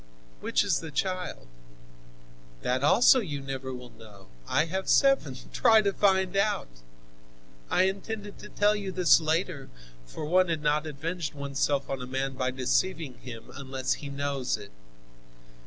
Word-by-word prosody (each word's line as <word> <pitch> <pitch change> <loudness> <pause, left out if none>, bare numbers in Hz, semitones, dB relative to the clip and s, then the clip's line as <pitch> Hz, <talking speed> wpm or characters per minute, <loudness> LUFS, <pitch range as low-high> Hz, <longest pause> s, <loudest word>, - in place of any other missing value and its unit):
Which - - +1
is - - +1
the 160 - -7
child? 180 - -3 1.2
That 130 +2 0
also 245 - +6
you 155 - -4
never 135 -1 -5
will 125 -1 -9
know. 110 -4 -15 0.2
I 155 - +2
have 190 +3 -3
seven; 270 - +3 0.2
try 220 -3 +5
to 200 -1 +1
find 190 -2 +2
out! 205 +1 +1 1.0
I 180 - +3
intended 200 +2 -3
to - - -10
tell 205 +1 +2
you 200 -2 -4
this 180 -2 +5
later, 160 -2 -1 0.4
for 150 - -6
one 180 +3 +3
has 165 - +1
not 150 +1 0
avenged 155 +1 -4
oneself 140 0 -1
on 135 -1 -4
a 125 - -6
man 135 +1 -2
by 130 0 -1
deceiving 130 +3 -1
him, 115 -3 -10
unless 135 -1 -2
he 145 - -6
knows 140 -3 -2
it. 100 -1 -11
150 Hz, 155 wpm, -28 LUFS, 130-190 Hz, 1.2 s, also